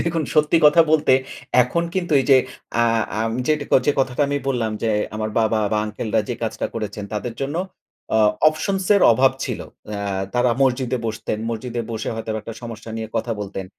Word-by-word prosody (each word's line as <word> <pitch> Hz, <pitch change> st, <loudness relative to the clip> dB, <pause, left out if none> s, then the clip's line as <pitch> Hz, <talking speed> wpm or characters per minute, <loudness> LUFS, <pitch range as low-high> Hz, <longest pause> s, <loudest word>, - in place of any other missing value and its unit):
দেখুন 165 Hz, -1 st, 0 dB
সত্যি 150 Hz, +2 st, +4 dB
কথা 150 Hz, +3 st, +7 dB
বলতে 155 Hz, -4 st, +4 dB, 0.5 s
এখন 170 Hz, +8 st, -1 dB
কিন্তু 175 Hz, -4 st, -1 dB
এই 130 Hz, -, -3 dB
যে, 135 Hz, -, +9 dB, 0.5 s
আ -, -, +4 dB, 0.4 s
আম 115 Hz, 0 st, -1 dB
যেটা 150 Hz, -1 st, +1 dB
ক -, -, -10 dB
যে, 145 Hz, -, +4 dB
কথাটা 130 Hz, +1 st, 0 dB
আমি 145 Hz, -, 0 dB
বললাম। 115 Hz, -4 st, 0 dB
যে, 115 Hz, -, +1 dB, 0.2 s
আমার 110 Hz, 0 st, -2 dB
বাবা, 110 Hz, 0 st, +2 dB
বা 105 Hz, -, +2 dB
আঙ্কেলরা 110 Hz, +1 st, -1 dB
যে, 120 Hz, -, -1 dB
কাজটা 110 Hz, -, -2 dB
করেছেন 105 Hz, -2 st, -4 dB
তাদের 115 Hz, +2 st, -4 dB
জন্য 145 Hz, +4 st, -2 dB, 0.6 s
অ -, -, +4 dB, 0.3 s
options 190 Hz, +4 st, -2 dB
এর 200 Hz, -, +3 dB
অভাব 130 Hz, +3 st, +4 dB
ছিল। -, -, -4 dB, 0.3 s
অ্যা 105 Hz, -1 st, -4 dB, 0.3 s
তারা 120 Hz, 0 st, +3 dB
মসজিদে 130 Hz, -1 st, +1 dB
বসতেন, 110 Hz, -1 st, -3 dB
মসজিদে 120 Hz, +1 st, -4 dB
বসে 110 Hz, -1 st, -4 dB
হয়তোবা 110 Hz, -1 st, -3 dB
একটা 115 Hz, -, -7 dB
সমস্যা 115 Hz, -1 st, -8 dB
নিয়ে 110 Hz, -1 st, -5 dB
কথা 120 Hz, -, -1 dB
বলতেন। 95 Hz, -1 st, -5 dB
120 Hz, 185 wpm, -21 LUFS, 110-145 Hz, 0.6 s, যে